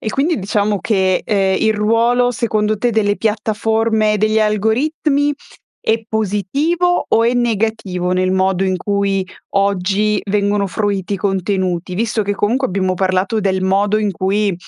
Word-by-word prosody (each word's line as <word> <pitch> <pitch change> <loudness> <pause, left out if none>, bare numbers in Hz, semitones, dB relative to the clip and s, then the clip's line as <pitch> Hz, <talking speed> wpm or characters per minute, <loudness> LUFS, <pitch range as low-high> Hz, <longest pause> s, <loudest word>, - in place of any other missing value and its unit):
E 220 - -4
quindi 300 +6 0
diciamo 205 +1 0
che, 190 -4 +1
ehm, 195 -2 +1
il 220 0 +2
ruolo 230 +4 +2
secondo 215 -2 -1
te 240 +2 +1
delle 205 -2 +1
piattaforme, 220 0 0
degli 215 +1 +1
algoritmi, 275 +8 +1 0.5
è 225 0 0
positivo 275 - 0
o 230 - +3
è 235 - +2
negativo, 220 -6 -1
nel 185 0 +1
modo 190 0 +1
in 185 -1 0
cui 195 0 -1 0.3
oggi 200 +1 +1
vengono 205 0 +1
fruiti 200 0 -2
i - - -2
contenuti? 185 -2 -2
Visto 220 +2 -1
che 205 0 -2
comunque, 245 +7 0
abbiamo 185 0 -1
parlato 190 +4 0
del 190 -1 0
modo 200 +2 +2
in 210 -1 0
cui, 195 +2 0
210 Hz, 145 wpm, -17 LUFS, 190-225 Hz, 0.5 s, o